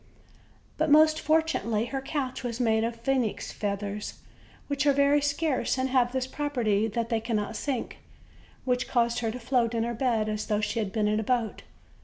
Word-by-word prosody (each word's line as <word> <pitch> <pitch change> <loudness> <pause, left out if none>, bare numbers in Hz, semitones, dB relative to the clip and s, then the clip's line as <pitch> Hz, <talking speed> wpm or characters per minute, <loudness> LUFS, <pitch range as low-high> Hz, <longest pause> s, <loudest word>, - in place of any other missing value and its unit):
But 315 0 +2
most 310 +1 +6
fortunately 310 -9 +1
her 270 +2 -4
couch 270 -2 -3
was 240 -1 -3
made 220 -2 +2
of 230 0 -1
phoenix 255 -3 -1
feathers, 205 0 -4 0.5
which 285 0 -1
are 285 - +6
very 280 +1 +4
scarce 290 -1 0
and 260 0 0
have 250 -2 +2
this 260 0 -1
property, 245 -7 0
that 230 +1 -2
they 230 -2 +1
cannot 225 -1 -2
sink, 265 -2 -3 0.7
which 250 -1 0
caused 235 -1 +1
her 230 -2 -1
to 240 +3 -5
float 240 -1 +1
in 225 - +1
her 235 +1 -2
bed 230 -3 0
as 215 0 -3
though 210 -2 +1
she 210 +2 -1
had 205 -3 -2
been 210 0 +1
in 210 +1 +1
a - - -1
boat. 235 -1 -1
240 Hz, 190 wpm, -27 LUFS, 220-270 Hz, 0.7 s, most